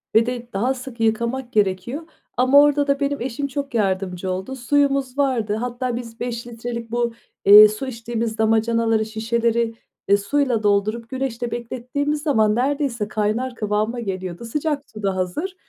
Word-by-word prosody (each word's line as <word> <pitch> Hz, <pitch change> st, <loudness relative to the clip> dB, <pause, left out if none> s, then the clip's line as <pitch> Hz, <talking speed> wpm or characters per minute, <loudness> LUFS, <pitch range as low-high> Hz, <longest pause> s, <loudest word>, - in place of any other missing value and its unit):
ve 225 Hz, -, +6 dB
de 245 Hz, -1 st, -4 dB
daha 240 Hz, +7 st, +1 dB
sık 255 Hz, -2 st, -9 dB
yıkamak 235 Hz, +3 st, 0 dB
gerekiyor. 210 Hz, -, 0 dB, 0.3 s
Ama 260 Hz, +3 st, +6 dB
orda 290 Hz, 0 st, +3 dB
da 280 Hz, 0 st, +1 dB
benim 280 Hz, -2 st, -1 dB
eşim 265 Hz, +3 st, -2 dB
çok 280 Hz, 0 st, -5 dB
yardımcı 190 Hz, -3 st, -1 dB
oldu. 190 Hz, +8 st, -4 dB
Suyumuz 275 Hz, +1 st, +1 dB
vardı, 240 Hz, -7 st, +1 dB
hatta 245 Hz, +1 st, -3 dB
biz 235 Hz, -1 st, -7 dB
5 240 Hz, -1 st, -4 dB
litrelik 235 Hz, 0 st, -6 dB
bu, 235 Hz, -1 st, 0 dB, 0.3 s
eee, 210 Hz, +1 st, +11 dB
su 215 Hz, +6 st, -5 dB
içtiğimiz 230 Hz, -2 st, -3 dB
damacanaları, 225 Hz, 0 st, +2 dB
şişeleri, 230 Hz, +1 st, 0 dB, 0.3 s
eee, 200 Hz, -, +5 dB
suyla 245 Hz, +1 st, 0 dB
doldurup 215 Hz, +3 st, +1 dB
güneşte 250 Hz, -3 st, -3 dB
beklettiğimiz 255 Hz, +5 st, -3 dB
zaman 220 Hz, -8 st, +3 dB
neredeyse 260 Hz, -4 st, 0 dB
kaynar 220 Hz, +4 st, -1 dB
kıvama 215 Hz, +3 st, -1 dB
geliyordu. 190 Hz, -1 st, -5 dB
Sıcak 295 Hz, +3 st, -2 dB
su 215 Hz, -1 st, -10 dB
da 195 Hz, -1 st, 0 dB
hazır. 245 Hz, -, -3 dB
235 Hz, 155 wpm, -22 LUFS, 215-265 Hz, 0.3 s, eee